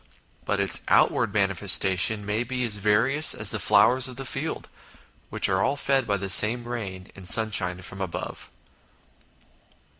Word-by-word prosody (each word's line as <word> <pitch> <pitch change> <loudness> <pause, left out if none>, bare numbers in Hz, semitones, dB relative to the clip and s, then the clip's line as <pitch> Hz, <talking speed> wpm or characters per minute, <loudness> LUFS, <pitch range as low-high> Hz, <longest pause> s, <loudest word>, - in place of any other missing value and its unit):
But - - -3
its - - +2
outward - - +1
manifestations 95 +3 +2
may 105 +3 -3
be 125 0 -4
as 105 -3 -3
various 115 +9 +2
as 105 -1 +3
the 110 - -1
flowers 105 +7 +2
of 130 - -10
the 135 +1 -6
field - - -5 0.6
which - - -1
are 95 0 -1
all 135 +5 -1
fed 135 -3 -2
by 100 -1 -1
the 100 0 -6
same 115 +5 +5
rain 95 -6 -8
and 95 -2 -10
sunshine 95 -4 +1
from 95 +2 -10
above. 95 -3 -7
105 Hz, 155 wpm, -23 LUFS, 95-120 Hz, 0.6 s, same